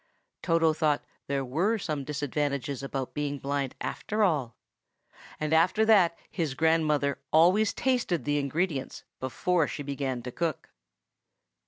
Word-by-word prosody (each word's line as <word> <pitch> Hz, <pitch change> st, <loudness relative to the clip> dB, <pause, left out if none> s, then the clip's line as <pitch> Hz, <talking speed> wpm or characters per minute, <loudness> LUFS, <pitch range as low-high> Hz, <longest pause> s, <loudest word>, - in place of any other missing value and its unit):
Toto 165 Hz, -2 st, +3 dB
thought 155 Hz, -2 st, +1 dB, 0.2 s
there 140 Hz, -1 st, -1 dB
were 175 Hz, -, +1 dB
some 155 Hz, -8 st, -3 dB
disadvantages 140 Hz, -1 st, -2 dB
about 135 Hz, -1 st, -4 dB
being 145 Hz, -1 st, -2 dB
blind, 140 Hz, -1 st, -2 dB
after 215 Hz, +1 st, -2 dB
all; 145 Hz, -, +1 dB, 0.8 s
and 155 Hz, 0 st, -1 dB
after 180 Hz, +7 st, +4 dB
that 190 Hz, -6 st, +5 dB
his 160 Hz, -7 st, -2 dB
grandmother 155 Hz, -3 st, +2 dB
always 185 Hz, +7 st, +5 dB
tasted 240 Hz, -, 0 dB
the 145 Hz, 0 st, +1 dB
ingredients 145 Hz, 0 st, -2 dB, 0.2 s
before 160 Hz, +6 st, 0 dB
she 145 Hz, -, -5 dB
began 135 Hz, -3 st, -3 dB
to 125 Hz, -, -5 dB
cook. 165 Hz, +1 st, -3 dB
150 Hz, 130 wpm, -28 LUFS, 140-170 Hz, 0.8 s, that